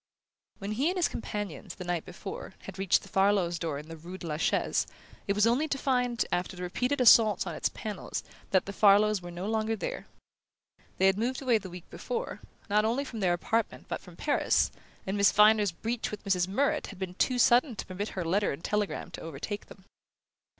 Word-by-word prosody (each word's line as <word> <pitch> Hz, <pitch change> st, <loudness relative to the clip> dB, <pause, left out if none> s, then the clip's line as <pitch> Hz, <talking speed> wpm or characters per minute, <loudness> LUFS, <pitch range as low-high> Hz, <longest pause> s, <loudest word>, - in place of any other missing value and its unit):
When 200 Hz, +1 st, -5 dB
he 265 Hz, +9 st, +1 dB
and 370 Hz, -, -2 dB
his 355 Hz, -, +3 dB
companion, 205 Hz, -4 st, -5 dB
the -, -, -6 dB
night 175 Hz, -2 st, -2 dB
before, 190 Hz, +1 st, -8 dB
had 195 Hz, -, -9 dB
reached 195 Hz, -2 st, +3 dB
the -, -, -12 dB
Farlows' 190 Hz, -3 st, +2 dB
door 160 Hz, -4 st, -2 dB
in 150 Hz, +2 st, -8 dB
the 165 Hz, -, -8 dB
rue 175 Hz, +4 st, -9 dB
de 185 Hz, -, -9 dB
la 150 Hz, -2 st, -2 dB
Chaise, -, -, +1 dB, 0.4 s
it 200 Hz, -, +2 dB
was 210 Hz, +1 st, +3 dB
only 250 Hz, +7 st, +2 dB
to 280 Hz, -, -1 dB
find, 250 Hz, -3 st, +1 dB
after 180 Hz, +1 st, -1 dB
repeated 250 Hz, +10 st, -1 dB
assaults 220 Hz, -5 st, +6 dB
on 170 Hz, -, -4 dB
its -, -, 0 dB
panels, 210 Hz, -3 st, -5 dB, 0.3 s
that 190 Hz, -, +3 dB
the 200 Hz, -, -6 dB
Farlows 205 Hz, 0 st, +5 dB
were 175 Hz, -, -8 dB
no 175 Hz, +2 st, -6 dB
longer 220 Hz, +1 st, 0 dB
there. 210 Hz, -, -5 dB, 0.9 s
They 190 Hz, -, +3 dB
had 195 Hz, +1 st, +4 dB
moved 250 Hz, +3 st, -1 dB
away 245 Hz, -5 st, +2 dB
the 190 Hz, -2 st, -9 dB
week 180 Hz, -1 st, -10 dB
before, -, -, -4 dB, 0.3 s
not 210 Hz, 0 st, +3 dB
only 240 Hz, +6 st, 0 dB
from 230 Hz, -4 st, -7 dB
their 180 Hz, -3 st, +2 dB
apartment 225 Hz, +6 st, -1 dB
but -, -, -4 dB
from -, -, -14 dB
Paris; -, -, +2 dB, 0.3 s
and 190 Hz, -, -2 dB
Miss 200 Hz, 0 st, +5 dB
Viner's 210 Hz, -1 st, +5 dB
breach 225 Hz, +7 st, -3 dB
with 210 Hz, -, -7 dB
Mrs. 185 Hz, -3 st, +1 dB
Murrett 280 Hz, +10 st, 0 dB
had 200 Hz, -, -10 dB
been 185 Hz, -1 st, -4 dB
too 250 Hz, +6 st, +1 dB
sudden 245 Hz, +1 st, +4 dB
to -, -, -5 dB
permit 195 Hz, +3 st, -4 dB
her 180 Hz, -, -1 dB
letter 200 Hz, +5 st, +1 dB
and 140 Hz, +5 st, -7 dB
telegram 210 Hz, -3 st, -2 dB
to -, -, -8 dB
overtake 165 Hz, +7 st, -6 dB
them. 190 Hz, -, -15 dB
205 Hz, 210 wpm, -29 LUFS, 180-230 Hz, 0.9 s, assaults